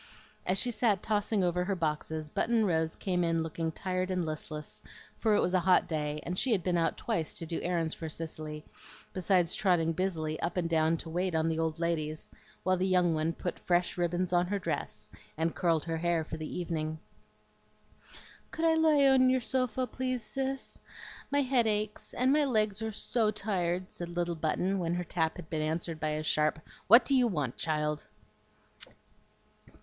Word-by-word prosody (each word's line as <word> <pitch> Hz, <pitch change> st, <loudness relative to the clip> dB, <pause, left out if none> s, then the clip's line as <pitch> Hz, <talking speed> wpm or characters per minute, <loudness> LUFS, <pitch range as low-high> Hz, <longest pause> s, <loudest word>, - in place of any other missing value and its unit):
As 185 Hz, -, +2 dB
she 245 Hz, -, +2 dB
sat 215 Hz, -5 st, +2 dB
tossing 210 Hz, -1 st, +1 dB
over 180 Hz, 0 st, +1 dB
her 195 Hz, +1 st, -1 dB
boxes, 155 Hz, -2 st, -2 dB
Button 230 Hz, -2 st, +2 dB
Rose 160 Hz, -3 st, +1 dB
came 180 Hz, -2 st, -1 dB
in 165 Hz, -1 st, +1 dB
looking 160 Hz, 0 st, -3 dB
tired 185 Hz, +1 st, -2 dB
and 180 Hz, -2 st, 0 dB
listless, 155 Hz, -1 st, -5 dB, 0.4 s
for 220 Hz, -2 st, +3 dB
it -, -, +3 dB
was 180 Hz, -, 0 dB
a 185 Hz, -, +4 dB
hot 180 Hz, +1 st, +4 dB
day, 150 Hz, -2 st, -2 dB
and 180 Hz, +2 st, -2 dB
she 245 Hz, +1 st, +3 dB
had 190 Hz, -5 st, +1 dB
been 180 Hz, 0 st, +1 dB
out 165 Hz, -2 st, +1 dB
twice 160 Hz, -2 st, -2 dB
to 165 Hz, -, -3 dB
do 165 Hz, +1 st, -3 dB
errands 170 Hz, -2 st, 0 dB
for 160 Hz, -, -6 dB
Cicely, 155 Hz, -1 st, -5 dB, 0.5 s
besides 180 Hz, -2 st, +2 dB
trotting 175 Hz, -5 st, +2 dB
busily 160 Hz, -3 st, -2 dB
up 175 Hz, -, -2 dB
and 175 Hz, -2 st, +1 dB
down 160 Hz, 0 st, +2 dB
to 165 Hz, -, -7 dB
wait 180 Hz, +1 st, -1 dB
on 160 Hz, 0 st, +2 dB
the 160 Hz, 0 st, -1 dB
old 160 Hz, -1 st, -1 dB
ladies 160 Hz, -2 st, -2 dB, 0.3 s
while 185 Hz, 0 st, +2 dB
the 185 Hz, +1 st, +1 dB
young 180 Hz, -2 st, +3 dB
one 155 Hz, +1 st, 0 dB
put 175 Hz, +1 st, -5 dB
fresh 175 Hz, 0 st, +1 dB
ribbons 175 Hz, +1 st, -1 dB
on 175 Hz, 0 st, +3 dB
her 205 Hz, +2 st, -1 dB
dress 145 Hz, -, -4 dB, 0.3 s
and 160 Hz, +1 st, 0 dB
curled 165 Hz, -4 st, +1 dB
her 165 Hz, -1 st, -2 dB
hair 170 Hz, -1 st, +1 dB
for 155 Hz, -, -6 dB
the 155 Hz, -1 st, -6 dB
evening. 160 Hz, -3 st, -3 dB, 1.5 s
"Could 325 Hz, -, -2 dB
I 325 Hz, -, +5 dB
lie 315 Hz, -3 st, +4 dB
on 260 Hz, -1 st, +6 dB
your 260 Hz, 0 st, +3 dB
sofa, 255 Hz, 0 st, -1 dB
please, 255 Hz, -1 st, -3 dB
Cis? 270 Hz, +4 st, -4 dB, 0.5 s
My 285 Hz, 0 st, +2 dB
head 250 Hz, -3 st, +2 dB
aches, 210 Hz, 0 st, -2 dB
and 255 Hz, +3 st, +3 dB
my 300 Hz, 0 st, +4 dB
legs 215 Hz, -5 st, +1 dB
are 220 Hz, 0 st, -2 dB
SO 220 Hz, +1 st, +1 dB
tired," 185 Hz, -4 st, -1 dB
said 175 Hz, 0 st, -7 dB
little 175 Hz, 0 st, 0 dB
Button, 175 Hz, +4 st, 0 dB
when 170 Hz, -1 st, -1 dB
her 180 Hz, -, -1 dB
tap 160 Hz, -2 st, -1 dB
had 180 Hz, -3 st, -9 dB
been 155 Hz, -1 st, -1 dB
answered 160 Hz, +1 st, -2 dB
by 155 Hz, -1 st, -1 dB
a 155 Hz, 0 st, -2 dB
sharp 155 Hz, 0 st, +2 dB, 0.3 s
"What 235 Hz, +5 st, +8 dB
do 280 Hz, -, +1 dB
you 255 Hz, -2 st, +5 dB
want, 150 Hz, -, -2 dB
child?" 150 Hz, -1 st, -1 dB
175 Hz, 190 wpm, -30 LUFS, 160-205 Hz, 1.5 s, What